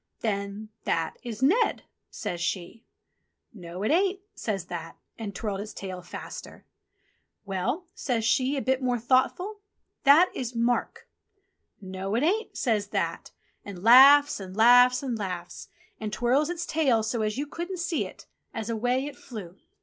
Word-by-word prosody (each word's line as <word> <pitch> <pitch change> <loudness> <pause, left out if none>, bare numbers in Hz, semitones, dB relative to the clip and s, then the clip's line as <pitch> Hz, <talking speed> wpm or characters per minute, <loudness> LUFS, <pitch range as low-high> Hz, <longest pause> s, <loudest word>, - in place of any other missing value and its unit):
"Then 200 0 -3 0.2
That 165 -1 -1
is 240 -1 -6
Ned," 415 - +3 0.3
says 175 -1 -5
she. 180 +5 -4 0.7
"No, 180 -2 -8
it 215 - +1
ain't," 380 +3 +2
says 200 - -3
That, 170 -2 -7 0.2
and 205 -4 -5
twirled 205 -3 -3
its 215 +1 -8
tail 185 -2 -6
faster. - - -9 0.8
"Well," 195 - -2
says 235 -5 -2
she 255 +4 +2
a 270 - -2
bit 260 0 +1
more 250 -1 +1
thoughtful, 265 - +1 0.4
"That 300 +6 +6
is 245 -1 -5
Mark." 235 +1 -1 0.7
"No, 190 +1 -4
it 240 - +1
ain't," 420 +8 0
says 215 -5 0
That, - - -2 0.3
and 195 -3 -9
laughs 280 +5 +8
and 190 0 -9
laughs 245 +3 +6
and 245 -4 -3
laughs, 180 -3 -5 0.3
and 215 -1 -4
twirls 255 +7 +1
its 345 -1 -3
tail 270 -10 +2
so 225 +1 -1
as 215 +1 -1
you 285 - -1
couldn't 345 +5 -5
see 340 -1 -1
it, - - -14 0.3
as 225 0 -3
away 245 +4 0
it 290 -1 -7
flew. 200 -8 -9
235 Hz, 155 wpm, -27 LUFS, 200-275 Hz, 0.8 s, laughs